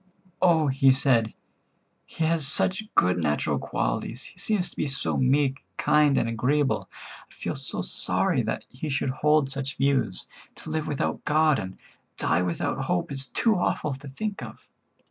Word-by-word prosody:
"Oh," 170 -4 +4
he 135 0 +4
said, 130 -4 +2 0.7
"he 165 - -4
has 160 -3 +2
such 190 +9 +3
good 90 0 +3
natural 75 -3 0
qualities; 85 - -2
he - - -12
seems 195 -2 0
to - - -15
be - - -1
so 135 0 -1
meek, 135 +1 +1
kind 150 -2 +3
and 115 - +1
agreeable; 130 +5 0 0.4
I - - -23
feel - - -5
so - - -4
sorry - - 0
that - - -3
he 140 +5 -6
should 135 -1 0
hold 150 +1 +2
such 135 0 -4
views. 135 -8 0 0.3
To - - -8
live 155 -1 -2
without 145 - -2
God 155 -2 +3
and 95 -2 -7 0.4
die 85 - +1
without 90 -2 -2
hope 90 +7 -1
is 135 -1 -1
too 225 - +2
awful 150 -4 -1
to 135 +2 -9
think 205 +9 -4
of. - - -10
135 Hz, 165 wpm, -26 LUFS, 130-155 Hz, 0.7 s, Oh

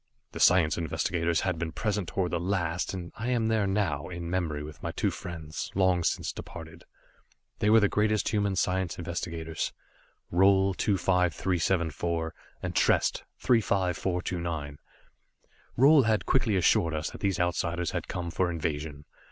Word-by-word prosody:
The - - -7
science 85 -3 +4
investigators 85 0 0
had 90 -3 -1
been 85 -1 -2
present 105 +1 -2
toward 90 -2 -1
the 85 - 0
last, 90 -1 -1
and 90 -2 -6
I 110 +3 -4
am 115 -3 +1
there 110 -3 +2
now, 95 -8 -1
in 85 -1 -5
memory 80 -5 -1
with 75 0 -10
my - - -3
two - - 0
friends, 80 -3 -6
long 95 -2 +3
since - - 0
departed. 80 0 -10 0.7
They 105 - +2
were 110 +1 +7
the 105 - +4
greatest 105 +1 +1
human 100 -2 0
science 90 -1 0
investigators 85 -2 -4 0.6
Roal, 95 +1 +4
25374 85 -3 0 0.3
and - - -3
Trest, - - +2 0.2
35429. 90 - 0 1.0
Roal 140 +4 +7
had 110 -1 +1
quickly 120 -6 +2
assured 85 -2 +3
us 75 +1 -3
that - - -11
these 100 -2 0
Outsiders 85 -1 0
had - - -3
come 85 -1 -4
for 90 +1 0
invasion. 75 -3 -4
90 Hz, 145 wpm, -28 LUFS, 85-95 Hz, 1.0 s, were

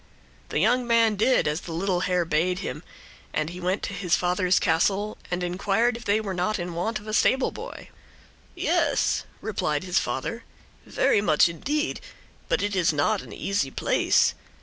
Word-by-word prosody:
The - - -2
young 240 +8 +2
man 230 -2 +4
did 235 +1 +3
as 150 +3 -1
the 170 - -8
little 180 +2 0
hare 180 -1 +1
bade 170 +3 +1
him, 175 -5 -5 0.5
and 155 +1 -1
he 180 - -8
went 185 +2 -1
to - - -3
his 180 -3 +1
father's 180 +1 +1
castle 195 +5 +1
and 180 0 -2
inquired 200 +7 +1
if 235 0 -9
they 205 +2 +2
were 205 -3 -4
not 185 +4 0
in 175 -1 -4
want 215 +7 -2
of 210 - -12
a 215 - -5
stableboy. 260 +4 0 0.7
"Yes," - - +1 0.2
replied 155 -8 -1
his 185 0 +1
father, 135 - -3 0.4
"very 205 - +2
much 160 -6 +4
indeed. 290 - -2 0.5
But - - +1
it 205 -1 -1
is 180 -2 +3
not 175 +8 +1
an - - -12
easy 195 -9 -1
place. - - +2
185 Hz, 170 wpm, -25 LUFS, 175-215 Hz, 0.7 s, man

